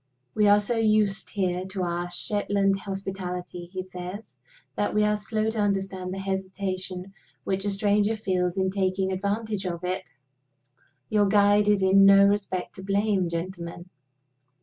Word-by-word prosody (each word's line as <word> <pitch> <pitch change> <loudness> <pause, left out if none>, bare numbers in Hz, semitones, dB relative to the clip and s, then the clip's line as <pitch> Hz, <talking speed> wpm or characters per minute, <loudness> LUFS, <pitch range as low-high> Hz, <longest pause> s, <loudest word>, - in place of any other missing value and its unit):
"We 210 -1 +3
are 205 0 +6
so 220 +3 -1
used 215 -3 +2
here 185 -3 -1
to 190 -1 -3
our 175 0 -2
Shetland 195 +1 0
hospitality," 185 -3 -5
he 185 -1 -4
says, 185 +3 -8 0.4
"that 205 - -1
we 210 - +4
are 210 0 +2
slow 215 +1 -1
to 220 - -4
understand 195 -2 -1
the 190 - -4
hesitation 190 -1 -4 0.3
which 195 +1 -2
a - - +1
stranger 205 +2 +2
feels 185 -3 -1
in 190 0 +1
taking 190 -1 0
advantage 200 +1 -2
of 170 0 -4
it. 185 +1 -3 1.0
Your 205 -1 +3
guide 205 +1 +4
is 205 -2 +3
in 195 +1 +6
no 195 0 +8
respect 200 -3 -1
to 190 - -8
blame, 200 -2 +1
gentlemen. 175 +1 -6
195 Hz, 150 wpm, -26 LUFS, 185-205 Hz, 1.0 s, no